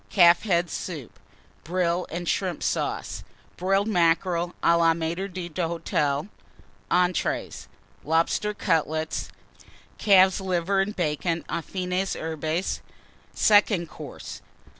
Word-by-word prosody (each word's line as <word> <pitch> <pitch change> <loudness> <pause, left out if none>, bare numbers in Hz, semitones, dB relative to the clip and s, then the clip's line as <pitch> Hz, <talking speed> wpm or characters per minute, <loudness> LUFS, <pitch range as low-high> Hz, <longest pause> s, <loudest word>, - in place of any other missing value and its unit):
Calf's 175 -1 +5
Head 175 -4 +1
Soup. 155 -9 -6 0.4
Brill 175 +1 0
and 175 +1 -5
Shrimp 185 -2 -1
Sauce. - - -2 0.3
Broiled 195 +3 +1
Mackerel 175 -2 +1
à 170 - +5
la 165 -1 +4
Maître 170 +4 -3
d'Hôtel. 165 -4 -1 0.6
ENTREES. 180 -1 0 0.4
Lobster 165 +7 +1
Cutlets. 160 -4 -1 0.7
Calf's 190 -2 +5
Liver 185 +1 0
and 205 +2 -2
Bacon, 165 0 -1
aux - - -1
fines 185 +2 -2
herbes. 160 +2 -2 0.5
SECOND 205 -5 +4
COURSE. - - -9
175 Hz, 100 wpm, -25 LUFS, 165-190 Hz, 0.7 s, Calf's